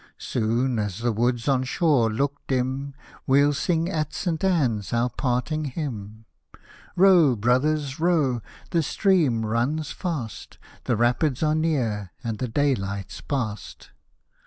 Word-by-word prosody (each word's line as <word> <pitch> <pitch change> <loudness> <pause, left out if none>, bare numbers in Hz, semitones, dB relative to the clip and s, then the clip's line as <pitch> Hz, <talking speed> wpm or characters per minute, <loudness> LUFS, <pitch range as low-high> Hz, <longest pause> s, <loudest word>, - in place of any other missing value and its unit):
Soon 120 +1 0
as 105 -3 -2
the 120 +1 0
woods 120 +2 0
on 135 -2 +3
shore 130 -4 +2
look 140 +5 -1
dim, 135 +2 -2 0.3
We'll 140 +2 +4
sing 165 +4 0
at 155 -5 -2
St. 170 -3 -2
Ann's 130 - +1
our 120 +1 +1
parting 130 +5 -1
hymn. 110 -7 -6 0.7
Row, 175 -8 +6
brothers, 135 +6 +1
row, 155 -8 +2 0.3
the 170 -2 +2
stream 155 - +2
runs 130 +8 -1
fast, 150 - -5 0.3
The 120 - +1
Rapids 125 +5 +1
are 155 0 +3
near 120 - -1
and 115 -3 -3
the 130 - -1
daylight's 105 -7 -1
past. 110 -8 -4
130 Hz, 130 wpm, -24 LUFS, 115-155 Hz, 0.7 s, Row